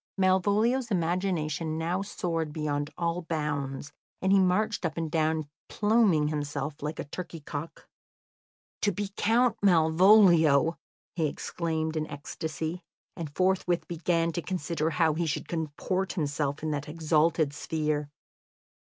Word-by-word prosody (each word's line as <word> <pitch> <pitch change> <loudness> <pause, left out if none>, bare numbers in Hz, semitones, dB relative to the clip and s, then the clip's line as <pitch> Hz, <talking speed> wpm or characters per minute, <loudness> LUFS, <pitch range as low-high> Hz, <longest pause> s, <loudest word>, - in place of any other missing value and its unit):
Malvolio's 205 +7 +2
imagination 170 -4 -1
now 170 +4 -1
soared 165 -5 -3
beyond 145 -1 -2
all 170 0 -1
bounds, 145 -4 -3 0.3
and 190 - +1
he 195 - +6
marched 195 +4 +1
up 165 -1 -2
and 165 -2 -2
down, 160 -2 +1 0.2
pluming 205 -8 +3
himself 145 -1 -3
like 150 +2 -4
a - - -3
turkey 165 +2 -7
cock. 145 +2 -7 0.9
"To 205 - +2
be 200 +1 -4
Count 240 +2 +2
Malvolio!" 170 -3 +5 0.4
he 160 -3 +1
exclaimed 160 +1 -3
in 155 0 -1
ecstasy, 160 +3 -5 0.3
and 165 -3 -5
forthwith 185 -2 +1
began 170 0 0
to 170 - -3
consider 165 -3 -2
how 165 -1 +2
he 165 +2 -1
should 145 - -2
comport 170 +4 -2
himself 145 -2 -2
in 155 - -1
that 145 0 -3
exalted 160 -1 +2
sphere. 150 -1 -2
165 Hz, 130 wpm, -28 LUFS, 150-185 Hz, 0.9 s, he